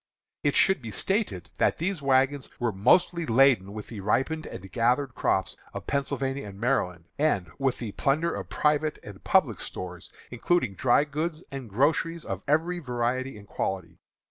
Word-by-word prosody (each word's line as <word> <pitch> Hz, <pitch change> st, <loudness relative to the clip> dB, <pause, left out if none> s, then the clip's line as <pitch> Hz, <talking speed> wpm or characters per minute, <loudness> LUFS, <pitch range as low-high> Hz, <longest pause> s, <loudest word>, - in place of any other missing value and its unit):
It 145 Hz, -, +2 dB
should 190 Hz, -7 st, +4 dB
be 115 Hz, -, -6 dB
stated 190 Hz, -, -1 dB
that -, -, +3 dB
these 175 Hz, 0 st, -2 dB
wagons 135 Hz, 0 st, +2 dB
were 120 Hz, -2 st, +1 dB
mostly 170 Hz, -, +3 dB
laden 120 Hz, -6 st, +4 dB
with 105 Hz, 0 st, -7 dB
the 110 Hz, -, -7 dB
ripened 135 Hz, +11 st, 0 dB
and 95 Hz, +1 st, -9 dB
gathered 125 Hz, +3 st, +1 dB
crops 95 Hz, -5 st, 0 dB, 0.2 s
of -, -, -5 dB
Pennsylvania 140 Hz, -2 st, -2 dB
and 100 Hz, -1 st, -10 dB
Maryland, 90 Hz, -9 st, 0 dB
and 100 Hz, -, +1 dB
with 135 Hz, -2 st, +1 dB
the 115 Hz, -4 st, -5 dB
plunder 155 Hz, +9 st, +1 dB
of -, -, -5 dB
private 150 Hz, 0 st, +1 dB
and 100 Hz, -2 st, -11 dB
public -, -, +3 dB
stores, 90 Hz, -2 st, -7 dB, 0.2 s
including 125 Hz, -, +1 dB
dry 125 Hz, +7 st, +3 dB
goods 155 Hz, +3 st, -3 dB
and 135 Hz, -4 st, -6 dB
groceries 155 Hz, +8 st, +1 dB
of 95 Hz, -1 st, -4 dB
every 165 Hz, +5 st, +1 dB
variety 125 Hz, -2 st, -2 dB
and 100 Hz, 0 st, -13 dB
quality. 90 Hz, -5 st, -3 dB
130 Hz, 165 wpm, -27 LUFS, 105-150 Hz, 0.2 s, should